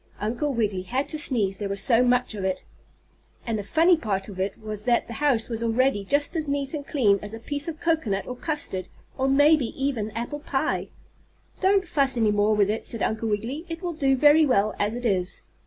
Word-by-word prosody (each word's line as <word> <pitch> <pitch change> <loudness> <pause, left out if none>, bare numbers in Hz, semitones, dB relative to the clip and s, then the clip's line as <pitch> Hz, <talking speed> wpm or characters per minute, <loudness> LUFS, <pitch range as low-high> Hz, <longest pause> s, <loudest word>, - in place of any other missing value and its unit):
Uncle 240 +8 -1
Wiggily 210 -7 -1
had 255 +9 -2
to 310 - -1
sneeze, 210 -10 0
there 205 -2 -3
was 200 0 -3
so 235 +4 +3
much 250 -1 +1
of 200 -3 -5
it. 190 -1 -2 0.8
And 225 -3 -1
the - - -4
funny 330 - +4
part 205 -9 -3
of 190 -2 -9
it 195 +1 -2
was 215 0 -6
that 240 -1 +2
the 235 - -8
house 255 -4 +1
was 230 -2 -4
already 230 -1 +1
just 285 - 0
as 315 -2 -2
neat 280 0 -2
and 290 -2 -5
clean 210 -9 +2
as 210 +1 -6
a - - -9
piece 285 +6 -3
of 320 -2 -5
cocoanut 310 -13 0
or 250 - -6
custard, 250 - -3 0.3
or 265 0 0
maybe 290 0 +4
even 260 -6 -1
apple 240 +5 -4
pie. 295 - -1 0.7
"Don't 380 -1 +3
fuss 275 -6 +2
any 220 -2 +3
more 205 +1 +2
with 205 -1 +3
it," 220 - -3
said 230 - -1
Uncle 220 +1 -1
Wiggily. 230 +9 -3
"It 330 +2 -6
will 350 -1 -2
do 275 -4 +2
very 295 +3 +6
well 215 -7 +2
as 210 +3 0
it 245 0 -5
is." 185 -4 0
240 Hz, 220 wpm, -25 LUFS, 210-290 Hz, 0.8 s, very